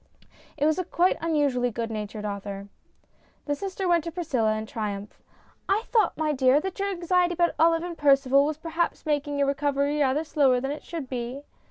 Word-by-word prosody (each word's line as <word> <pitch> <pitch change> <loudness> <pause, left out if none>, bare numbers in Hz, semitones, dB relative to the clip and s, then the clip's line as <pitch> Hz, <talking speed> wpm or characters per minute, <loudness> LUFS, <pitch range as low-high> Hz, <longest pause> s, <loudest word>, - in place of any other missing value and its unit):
It 295 - +1
was 315 +3 +2
a - - 0
quite 355 +1 +2
unusually 290 -7 +1
good 230 0 -4
natured 210 0 -5
author. 200 -1 -5 0.8
The 290 - 0
sister 380 +4 -3
went 340 -2 +3
to 335 - -4
Priscilla 270 -11 0
in 215 - -4
triumph. 210 -2 -5 0.2
" - - -32
I 405 +3 +2
thought, 435 -7 +2
my 310 0 0
dear, 260 +1 +4
that 380 +4 -5
your 400 0 0
anxiety 355 -1 +1
about 345 0 +2
Olive 330 +1 +4
and 350 -1 -5
Percival 275 -2 +4
was 305 -1 -3
perhaps 330 +2 -2
making 290 -1 -1
your 280 -1 +2
recovery 285 +1 0
rather 285 +2 +2
slower 280 -5 +3
than 270 +2 -3
it 295 - -6
should 325 -6 -6
be." 250 +2 -5
290 Hz, 195 wpm, -26 LUFS, 255-335 Hz, 0.8 s, dear